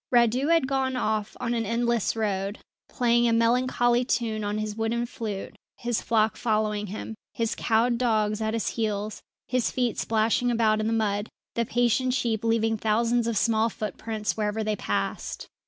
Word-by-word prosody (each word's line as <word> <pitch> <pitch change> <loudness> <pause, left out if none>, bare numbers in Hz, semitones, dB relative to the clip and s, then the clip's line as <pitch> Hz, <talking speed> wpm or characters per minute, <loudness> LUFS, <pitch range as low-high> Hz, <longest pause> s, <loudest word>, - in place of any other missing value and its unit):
Radu 245 +3 +3
had 330 -5 +4
gone 265 -1 0
off 215 -3 -1
on 235 - -1
an 230 -1 0
endless 235 0 0
road, 200 -2 -1 0.3
playing 240 -1 +2
a 230 - +3
melancholy 240 +1 +3
tune 225 -4 -1
on 205 +1 -1
his 215 -1 -3
wooden 225 +2 -1
flute, 220 -5 -5 0.2
his 240 -1 -1
flock 220 -1 +1
following 215 -2 0
him, 215 +3 -6 0.2
his 230 -1 0
cowed 235 +1 +1
dogs 215 -3 +1
at 220 +1 0
his 230 - -1
heels, 215 -2 -2 0.3
his 250 -2 +1
feet 245 -2 -1
splashing 225 +2 +1
about 225 -2 +2
in 215 - 0
the - - 0
mud, 210 -2 0 0.2
the 235 - 0
patient 245 +2 +2
sheep 225 -5 -1
leaving 225 -1 +2
thousands 230 +2 +1
of 230 -2 0
small 225 +1 +2
footprints 215 0 -3
wherever 215 0 -1
they 215 0 0
passed. 100 - -3
225 Hz, 170 wpm, -26 LUFS, 215-240 Hz, 0.3 s, had